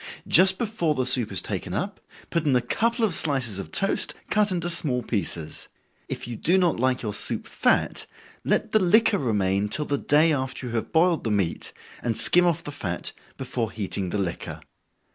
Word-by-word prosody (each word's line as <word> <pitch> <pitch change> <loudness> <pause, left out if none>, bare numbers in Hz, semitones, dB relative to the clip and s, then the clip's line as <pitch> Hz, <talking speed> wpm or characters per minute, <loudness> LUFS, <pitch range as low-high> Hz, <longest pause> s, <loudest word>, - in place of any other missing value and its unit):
Just 190 +1 +7
before 200 -9 -1
the 130 -2 -1
soup 125 -4 +5
is 95 - +3
taken - - -4
up, - - -4 0.3
put 170 - 0
in 145 -4 +2
a - - +4
couple 230 - 0
of 200 - -2
slices 130 -11 -1
of 95 - -8
toast, 195 - -1 0.2
cut 210 -1 +2
into 175 -2 -2
small 145 -8 0
pieces. 85 -7 -4 0.4
If - - -5
you 120 - -5
do 175 - +2
not 175 -9 +1
like 130 0 0
your 105 -2 -3
soup - - -2
fat, - - 0 0.4
let - - 0
the 215 - +4
liquor 205 +2 +3
remain 100 -4 0
till 150 +7 -2
the 140 -1 -2
day 155 +2 +3
after 130 -2 -4
you 120 - -6
have 115 - -3
boiled 165 0 +2
the 115 - -2
meat, 100 -5 -1 0.3
and 115 -2 -1
skim 180 0 +5
off 170 -3 0
the 145 - -6
fat 95 -12 -3 0.3
before 125 -4 -3
heating 100 -3 -4
the 105 - -2
liquor. 95 -4 -4
130 Hz, 195 wpm, -24 LUFS, 110-175 Hz, 0.4 s, Just